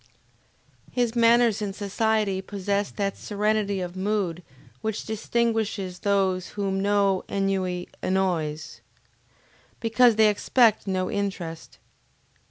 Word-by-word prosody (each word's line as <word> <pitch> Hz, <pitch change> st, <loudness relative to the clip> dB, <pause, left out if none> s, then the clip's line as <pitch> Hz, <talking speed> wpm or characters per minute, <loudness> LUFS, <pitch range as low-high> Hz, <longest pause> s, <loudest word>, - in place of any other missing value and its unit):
His 245 Hz, -2 st, 0 dB
manners 235 Hz, -2 st, +4 dB
in 200 Hz, -2 st, -3 dB
society 205 Hz, -1 st, 0 dB
possessed 200 Hz, +1 st, -2 dB
that 200 Hz, -1 st, -1 dB
serenity 210 Hz, -1 st, -1 dB
of 180 Hz, 0 st, -5 dB
mood 190 Hz, -3 st, -1 dB, 0.4 s
which 220 Hz, -1 st, -3 dB
distinguishes 220 Hz, -4 st, -1 dB
those 190 Hz, -2 st, +1 dB
whom 195 Hz, -1 st, -1 dB
no 200 Hz, -1 st, +2 dB
ennui 190 Hz, -2 st, -1 dB
annoys, 170 Hz, -5 st, -1 dB, 1.0 s
because 230 Hz, +1 st, +4 dB
they 220 Hz, 0 st, +5 dB
expect 220 Hz, +1 st, +3 dB
no 185 Hz, -1 st, -1 dB
interest. 185 Hz, -5 st, -4 dB
200 Hz, 100 wpm, -25 LUFS, 190-220 Hz, 1.0 s, they